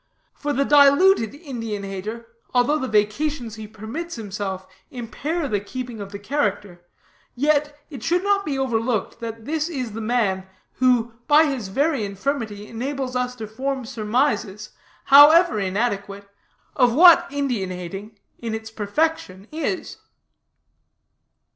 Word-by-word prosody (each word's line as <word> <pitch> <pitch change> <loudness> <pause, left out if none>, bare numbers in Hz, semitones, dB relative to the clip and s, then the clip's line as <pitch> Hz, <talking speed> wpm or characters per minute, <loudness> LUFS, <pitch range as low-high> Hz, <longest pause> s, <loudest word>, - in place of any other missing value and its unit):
"For 290 - -3
the 275 0 +1
diluted 285 - +5
Indian 230 - -5
hater, 200 +4 -6 0.3
although 250 +5 +3
the 260 - -2
vacations 225 +4 0
he 220 -1 -8
permits 220 +11 -6
himself 200 -3 -5 0.2
impair 285 +7 -4
the 210 -5 0
keeping 240 +2 -7
of 200 0 -8
the 200 - -6
character, 205 -6 -2 0.5
yet, 295 +2 +1
it 275 - -8
should 350 +2 +1
not 400 0 +2
be 285 -6 -2
overlooked 235 -4 -1
that 225 -1 -7
this 315 +3 -1
is 255 -8 -4
the 225 +2 -6
man 215 -5 0 0.3
who, 245 -2 +2
by 300 +2 +6
his 265 -8 -3
very 275 +4 0
infirmity, 210 0 -3
enables 260 +2 -4
us 250 0 -1
to 225 -3 -6
form 260 +4 -3
surmises, 220 -2 -1 0.3
however 290 -2 +7
inadequate, 200 0 -2 0.5
of 245 -4 +3
what 345 +2 +8
Indian 255 -9 -1
hating 195 +4 -7 0.2
in 230 -2 -3
its 220 0 -7
perfection 210 -3 -2
is." 320 +4 -3
240 Hz, 135 wpm, -22 LUFS, 210-285 Hz, 0.5 s, what